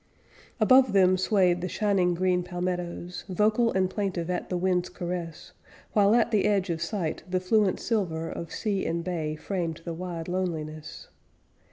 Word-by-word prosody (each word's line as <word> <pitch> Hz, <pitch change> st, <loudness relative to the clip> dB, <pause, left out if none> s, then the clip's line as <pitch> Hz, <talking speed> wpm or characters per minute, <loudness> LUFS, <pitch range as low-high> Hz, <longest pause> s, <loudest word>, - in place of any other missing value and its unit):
Above 255 Hz, +1 st, +5 dB
them 185 Hz, -1 st, +5 dB
swayed 185 Hz, -2 st, +2 dB
the 180 Hz, -, -3 dB
shining 190 Hz, -4 st, +1 dB
green 180 Hz, 0 st, +1 dB
palmettoes 180 Hz, 0 st, -4 dB
Vocal 215 Hz, +5 st, +2 dB
and 190 Hz, 0 st, +2 dB
plaintive 185 Hz, -3 st, -2 dB
at 180 Hz, -, -3 dB
the 180 Hz, -, -1 dB
winds' 180 Hz, 0 st, +1 dB
caress; 175 Hz, -2 st, -6 dB, 0.4 s
While, 205 Hz, 0 st, +5 dB
at 235 Hz, -1 st, +3 dB
the 210 Hz, -3 st, +2 dB
edge 195 Hz, -3 st, +1 dB
of 165 Hz, -1 st, -3 dB
sight, 175 Hz, -3 st, -2 dB
the 185 Hz, 0 st, +1 dB
fluent 190 Hz, +1 st, +2 dB
silver 170 Hz, -8 st, -1 dB
Of 170 Hz, 0 st, -6 dB
sea 205 Hz, -4 st, -1 dB
and 170 Hz, +1 st, -1 dB
bay 160 Hz, -4 st, -2 dB
framed 165 Hz, -1 st, -3 dB
the 170 Hz, -, -3 dB
wide 170 Hz, -1 st, -5 dB
loneliness. 155 Hz, -4 st, -4 dB
180 Hz, 160 wpm, -27 LUFS, 170-195 Hz, 0.4 s, Above